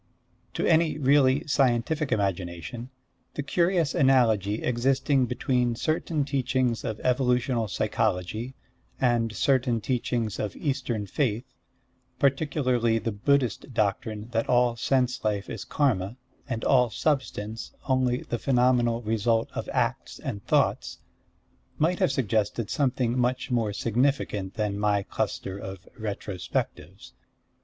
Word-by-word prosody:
To - - 0
any 160 -2 +3
really 135 -1 +3
scientific 135 +2 +1
imagination, 100 +3 -2 0.5
the 145 - -2
curious 170 0 +1
analogy 110 -6 +3
existing 130 +2 +2
between 125 -1 0
certain 155 +2 -1
teachings 130 -3 0
of 110 -4 -4
evolutional 125 -2 +1
psychology 105 +6 -1 0.4
and 120 -3 +2
certain 130 -4 +2
teachings 115 -2 -2
of 105 -3 -3
Eastern 130 -7 -2
faith, 120 +1 -2 0.6
particularly 130 -5 +1
the 115 +1 -2
Buddhist 125 +2 0
doctrine 105 +1 -1
that 115 0 -1
all 120 -1 +3
sense 125 +1 0
life 105 -2 -1
is 110 -3 -5
Karma, 115 -7 0 0.3
and 115 -3 -3
all 125 -3 +4
substance 115 -6 -2 0.2
only 130 -2 +1
the 120 - -3
phenomenal 120 -2 +2
result 115 +1 +1
of - - -4
acts - - -1
and 100 -1 -5
thoughts, - - +1 0.8
might 170 +4 +1
have - - +3
suggested 110 -3 0
something 125 -4 +1
much 125 +1 0
more 115 -4 +1
significant 115 -3 0
than 105 -2 -1
my 105 -1 +2
cluster 95 0 -3
of 95 -2 -8
Retrospectives. 100 - -4
120 Hz, 115 wpm, -26 LUFS, 110-135 Hz, 0.8 s, all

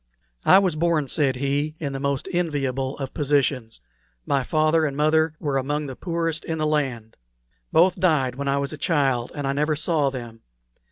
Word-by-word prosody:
"I 190 - +8
was 190 -5 +2
born," 155 -2 +1
said 140 -5 +2
he, 140 +3 -1
"in 140 -3 -3
the 135 - -4
most 140 -1 -2
enviable 135 -6 -1
of 135 -2 -5
positions. 140 -5 0 0.4
My 140 - +1
father 155 +4 +2
and 140 -3 -2
mother 155 +1 +2
were 140 -2 -1
among 145 +3 -2
the 135 -2 -6
poorest 165 -1 -2
in 160 - -3
the 155 - 0
land. 135 -7 -2 0.5
Both 180 +2 +4
died 150 -8 +2
when 140 +2 -5
I 140 0 +1
was 140 +1 -2
a 155 - -8
child, 135 -7 +1
and 145 -2 -3
I 135 - 0
never 150 +2 0
saw 150 -2 +1
them. 120 -4 -8
145 Hz, 185 wpm, -23 LUFS, 135-155 Hz, 0.5 s, I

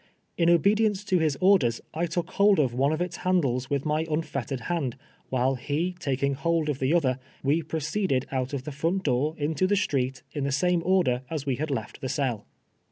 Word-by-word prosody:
In 170 -1 +3
obedience 205 +4 +3
to 190 -3 +1
his 155 -4 +1
orders, 180 -12 +4
I 170 +2 -1
took 170 +1 -3
hold 200 0 +4
of 130 -5 +2
one 135 +4 +2
of 155 +2 -1
its 180 -1 -3
handles 135 -9 0
with 140 0 -1
my 155 +1 0
unfettered 140 -5 -2
hand, 140 -4 -2 0.3
while 130 +1 +1
he 145 +8 -2
taking 140 -3 0
hold 160 +2 0
of 140 -2 -2
the 130 +2 +1
other, 135 -7 +2 0.2
we 145 +5 +2
proceeded 160 -3 -1
out 130 -1 -1
of 140 -3 -3
the 150 - -6
front 165 +7 -1
door 145 +3 +1
into 155 +4 0
tlie 205 +1 +2
street 135 -8 -1
in 145 - -3
the 140 - 0
same 175 +5 +2
order 170 -10 +2
as 155 -4 -3
we 135 -3 0
had 155 +1 -2
left 115 -6 -4
the 130 - -3
cell. 125 -8 -2
150 Hz, 205 wpm, -27 LUFS, 135-175 Hz, 0.3 s, orders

